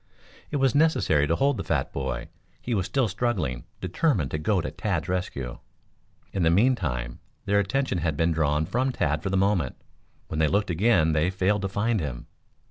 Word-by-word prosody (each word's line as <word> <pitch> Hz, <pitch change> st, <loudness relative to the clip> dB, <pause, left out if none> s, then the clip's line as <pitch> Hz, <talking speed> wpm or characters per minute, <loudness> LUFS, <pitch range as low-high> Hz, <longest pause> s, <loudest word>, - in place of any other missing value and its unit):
It -, -, -4 dB
was 135 Hz, -3 st, +2 dB
necessary 145 Hz, -, +3 dB
to 85 Hz, -, +2 dB
hold 140 Hz, +5 st, +2 dB
the -, -, -3 dB
fat 75 Hz, -5 st, -1 dB
boy. 65 Hz, -1 st, -3 dB, 0.3 s
He 120 Hz, -, -3 dB
was 95 Hz, -3 st, 0 dB
still 130 Hz, +2 st, +1 dB
struggling, 95 Hz, -, -2 dB, 0.2 s
determined 95 Hz, -, 0 dB
to 80 Hz, -, -2 dB
go 95 Hz, +5 st, +1 dB
to -, -, -3 dB
Tad's -, -, -2 dB
rescue. 70 Hz, -9 st, -3 dB, 0.7 s
In 95 Hz, -, -1 dB
the 80 Hz, -, +4 dB
meantime 80 Hz, -, +1 dB, 0.3 s
their 100 Hz, 0 st, +3 dB
attention 100 Hz, 0 st, 0 dB
had 80 Hz, -3 st, -1 dB
been 80 Hz, +1 st, +2 dB
drawn 80 Hz, -1 st, +1 dB
from 125 Hz, +9 st, 0 dB
Tad 75 Hz, -, 0 dB
for 95 Hz, -, -2 dB
the 95 Hz, -, +1 dB
moment. 95 Hz, -8 st, +1 dB, 0.5 s
When 80 Hz, -, -4 dB
they 80 Hz, -, +4 dB
looked 100 Hz, +2 st, +1 dB
again 85 Hz, -3 st, +3 dB
they 80 Hz, +3 st, +2 dB
failed 95 Hz, +2 st, +1 dB
to 95 Hz, -, -2 dB
find 105 Hz, +3 st, 0 dB
him. 70 Hz, -7 st, -5 dB
90 Hz, 190 wpm, -26 LUFS, 75-110 Hz, 0.7 s, the